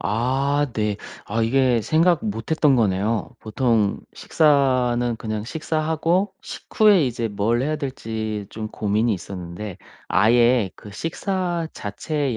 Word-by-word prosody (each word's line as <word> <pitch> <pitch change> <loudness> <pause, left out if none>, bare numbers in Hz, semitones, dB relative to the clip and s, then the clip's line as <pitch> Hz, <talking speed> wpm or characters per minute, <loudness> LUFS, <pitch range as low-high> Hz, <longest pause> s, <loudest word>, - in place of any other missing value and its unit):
아 135 +6 0
네. 105 -2 0 0.3
아 115 +3 -2
이게 125 0 +3
생각 165 - +3
못 110 +5 -4
했던 150 -3 +4
거네요. 105 0 0
보통 110 -2 0
식사는 130 -5 +2
그냥 110 -1 -4
식사하고 160 - -1
식후에 205 -8 +2
이제 120 -2 -2
뭘 110 +4 0
해야 155 +2 -1
될지 110 -7 -4
좀 110 -1 -5
고민이 110 +2 0
있었는데 90 +1 -7 0.3
아예 120 -2 +4
그 105 - -12
식사 175 - -2
자체의 125 +5 -3
120 Hz, 245 characters per minute, -22 LUFS, 110-150 Hz, 0.3 s, 했던